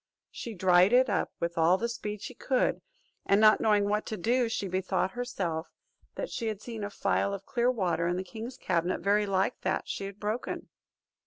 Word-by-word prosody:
She 230 -2 -6
dried 185 +3 +5
it 255 -2 +5
up - - 0
with 170 0 -2
all 170 +3 +5
the 235 - -1
speed 210 -3 -5
she - - -6
could, 255 +1 0 0.5
and 200 - +4
not 215 0 +6
knowing 210 -2 +3
what 210 +1 +1
to 215 - -3
do, 240 +5 +1
she 205 -3 -2
bethought 185 +1 0
herself 190 -9 -3 0.5
that - - -4
she 230 - -3
had 215 -3 -2
seen 225 -1 -6
a 205 - -3
phial 200 0 0
of 195 0 -10
clear 240 -1 +1
water 185 -8 0
in 175 +1 0
the 185 - -2
king's 225 +6 -8
cabinet 175 0 0
very 205 +1 +2
like 190 0 0
that - - -1
she 195 - -4
had 200 +1 -8
broken. 215 +4 -3
205 Hz, 200 wpm, -29 LUFS, 185-230 Hz, 0.5 s, not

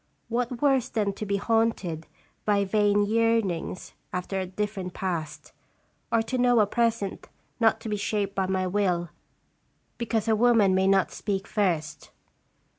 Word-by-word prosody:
What 240 +2 -2
worse 270 -4 +3
than 205 -3 0
to 210 +2 -6
be 200 - +1
haunted 205 -7 0 0.4
by 205 -1 +2
vain 205 0 +3
yearnings 220 -6 0 0.2
after 180 +2 -3
a 185 - -3
different 190 -1 -4
past, 170 -5 -4 0.6
or 225 -1 +3
to 255 +3 -3
know 245 -1 +4
a 210 - +5
present 230 -2 -1 0.3
not 225 -1 +3
to - - -7
be 210 -1 -1
shaped 205 -1 -1
by 190 -2 0
my 190 0 0
will 180 -3 0 0.9
because 230 -2 -1
a 220 - +4
woman 220 -4 +4
may 190 +1 +3
not 195 -1 +3
speak 195 -2 -3
first. 175 -7 -1
205 Hz, 150 wpm, -26 LUFS, 190-225 Hz, 0.9 s, a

